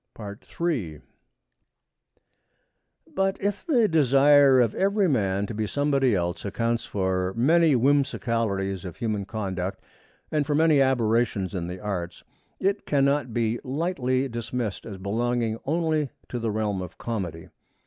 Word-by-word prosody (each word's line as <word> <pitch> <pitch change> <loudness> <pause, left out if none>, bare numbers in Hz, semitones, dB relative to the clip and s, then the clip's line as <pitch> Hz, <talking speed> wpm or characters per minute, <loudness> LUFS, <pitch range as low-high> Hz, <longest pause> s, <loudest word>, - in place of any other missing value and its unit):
III 120 - -1 2.1
But 195 0 0
if 200 0 -2
the 245 -9 +4
desire 140 -3 +5
of 115 -3 +3
every 200 0 +2
man 100 - +1
to 115 - -6
be 110 0 -2
somebody 140 -3 +1
else 85 0 -2
accounts 115 +3 -1
for 95 -1 -1
many 160 +5 +4
whimsicalities 115 -8 0
of 90 -4 -8
human 105 -4 -2
conduct 95 -3 -4 0.5
and 150 -1 +1
for 150 - +1
many 155 -2 +4
aberrations 115 -6 +1
in 85 -3 -3
the 90 +1 -6
arts, 90 -4 -4 0.4
it 200 +2 -1
cannot 140 -2 +2
be 115 0 0
lightly 135 -3 -1
dismissed 120 -3 -4
as 100 -4 -7
belonging 115 +3 -1
only 155 -1 0 0.2
to 125 - -3
the 115 -1 -1
realm 105 -3 -1
of 90 -3 -8
comedy. 90 -8 -5
120 Hz, 130 wpm, -25 LUFS, 100-145 Hz, 2.1 s, desire